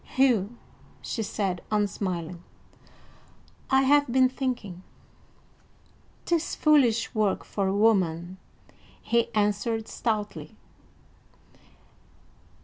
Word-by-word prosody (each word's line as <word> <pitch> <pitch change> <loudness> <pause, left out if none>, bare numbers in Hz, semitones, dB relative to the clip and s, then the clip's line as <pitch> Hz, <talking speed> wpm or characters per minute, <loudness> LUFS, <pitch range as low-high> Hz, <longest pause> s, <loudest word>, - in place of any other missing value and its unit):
"Hugh," 240 -4 +2 0.5
she 225 - -3
said, 195 -4 -2
unsmiling, 185 -5 -2 1.3
"I 265 0 +4
have 285 -1 +3
been 255 0 +4
thinking." 245 -9 -4 1.4
"'Tis 340 -1 0
foolish 260 -7 +3
work 215 -3 0
for 195 -2 -2
a 190 - 0
woman," 185 -4 +1 0.6
he 235 0 0
answered 215 +2 0
stoutly. 215 -3 -3
215 Hz, 80 wpm, -26 LUFS, 195-255 Hz, 1.4 s, I